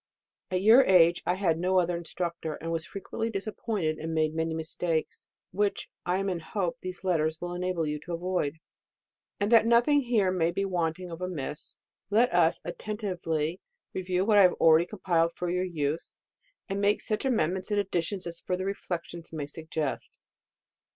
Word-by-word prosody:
At 185 0 -1
your 230 +6 +8
age, 175 -2 +5
I 180 - +2
had 170 -4 +1
no 185 +2 +2
other 175 -1 +2
instructor; 170 -2 -4
was 165 -1 -2
frequently 225 +3 -4
disappointed, 200 -5 -2
and 160 0 -4
made 155 -1 +1
many 160 0 -1
mistakes, 160 0 -2 0.2
which 205 +1 -1 0.2
I 180 +1 +2
am 195 +1 -1
in 180 -3 -1
hope 175 +1 -3
these 185 0 -7
letters 160 -4 +1
will 175 0 -4
enable 180 -2 -1
you 150 0 -2
to 175 - -5
avoid. 170 -4 -1 0.8
And 205 +2 0
that 230 -1 +6
nothing 240 +5 +5
here 225 -7 +2
may 170 -3 +1
be 195 +3 -1
wanting 175 -1 -2
of 165 +2 -7
amiss, 155 -5 -4 0.3
let 230 +4 +3
us 170 -2 +4
attentively 175 -5 -3 0.3
review 185 0 0
what 210 -1 +5
I - - +9
have 180 -2 +6
already 165 +1 +5
compiled 170 -5 +1
for 175 -1 -2
your 180 +1 0
use, 155 -3 -3 0.5
and 200 -1 -2
make 205 +1 +3
such 215 - -2
amendments 190 - 0
and 205 -1 +1
additions 190 -1 -1
as 170 -1 -5
further 185 +1 -2
reflec 190 -3 -3
tions 170 -1 -8
may 155 -3 -4
suggest. 155 -1 -4
180 Hz, 170 wpm, -28 LUFS, 165-195 Hz, 0.8 s, I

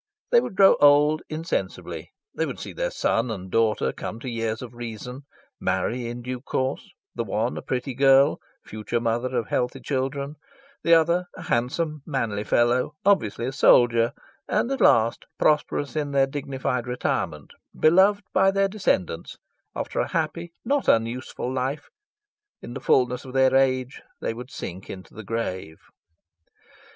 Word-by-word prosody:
They 480 -1 +6
would 190 - -6
grow 195 0 +6
old 145 +2 +5
insensibly; 160 +2 -4 0.2
they - - -1
would - - -6
see - - -7
their - - -1
son 115 - 0
and 95 -4 -6
daughter 110 -11 +1
come 110 - -6
to 130 - -7
years 115 -1 -2
of 125 -1 -9
reason, 120 +3 -7 0.3
marry 105 +6 -1
in 120 +1 -6
due 125 0 -5
course 130 0 -2 0.2
the 115 - -2
one 110 +3 -1
a - - -5
pretty 130 +1 -3
girl, 135 +1 +5 0.3
future 110 +2 -3
mother 120 +2 -1
of 115 - -2
healthy 125 0 -1
children; 140 +2 -3 0.4
the 170 - +5
other 170 +2 +3
a - - -9
handsome, 150 +6 -1
manly 115 -9 -2
fellow, 120 +5 +2
obviously 120 - +2
a 130 - -2
soldier; 120 -3 +4 0.3
and 250 - 0
at 270 - -2
last, 115 +1 +4
prosperous 150 -1 +1
in 150 -2 -1
their 135 -1 +4
dignified 135 -3 -3
retirement, 110 - -2 0.3
beloved 190 +5 +5
by 190 +1 +5
their 195 0 +2
descendants, 100 - -1 0.4
after - - -3
a - - +1
happy, 165 +1 -2
not 280 +3 0
unuseful 120 +2 0
life, 135 +3 -3 0.7
in 120 - -9
the - - -6
fullness 125 -1 +2
of 130 - -10
their 130 -1 +4
age 130 -1 +1 0.2
they - - -2
would 125 +2 -9
sink 95 -6 -7
into 95 -1 -9
the 110 - -9
grave. 95 -7 -4
130 Hz, 155 wpm, -25 LUFS, 115-150 Hz, 0.7 s, They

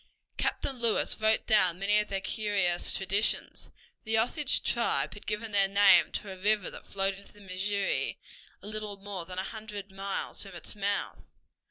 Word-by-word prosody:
Captain 265 -3 -2
Lewis 230 -2 +2
wrote 220 0 +3
down 185 -6 +4
many 205 +2 +3
of 210 - -1
their 195 -1 -2
curious 195 -5 0
traditions. 195 +3 0 0.3
The 220 0 +1
Osage 255 +5 +2
tribe 235 -1 +1
had 205 - -13
given 215 +1 -3
their 200 -1 +4
name 200 0 +6
to 200 - -3
a 190 - -8
river 210 -1 +2
that - - -11
flowed 195 0 0
into 200 +1 -13
the 205 - -17
Missouri 195 +1 -2 0.5
a - - -7
little 215 -1 -4
more 195 -3 -7
than 180 0 -7
a 185 - 0
hundred 210 -2 -7
miles 195 0 -2
from - - -3
its - - -6
mouth. 205 0 -2
205 Hz, 175 wpm, -29 LUFS, 195-215 Hz, 0.5 s, name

